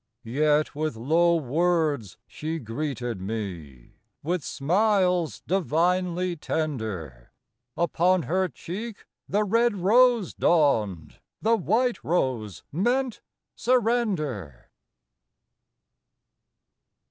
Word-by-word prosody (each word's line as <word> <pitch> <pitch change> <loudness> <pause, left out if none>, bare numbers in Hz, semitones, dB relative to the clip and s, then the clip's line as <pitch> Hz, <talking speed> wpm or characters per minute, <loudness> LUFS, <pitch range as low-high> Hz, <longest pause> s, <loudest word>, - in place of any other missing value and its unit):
Yet 150 +5 +1
with 155 -3 -2
low 165 +9 +3
words 155 - 0
she 160 +2 -5
greeted 120 - -4
me, 90 - -6 0.2
With 170 +1 -1
smiles 180 +1 +1
divinely 180 +1 0
tender; 110 - -4 0.5
Upon 175 +1 +2
her 185 +5 +1
cheek 195 - -7 0.2
the 210 +2 +2
red 230 +2 +2
rose 230 +1 +4
dawned, 105 - +1 0.2
The 225 +2 +4
white 230 +5 0
rose 125 - -1
meant 245 - 0 0.3
surrender. 205 - 0
165 Hz, 80 wpm, -26 LUFS, 120-190 Hz, 0.5 s, rose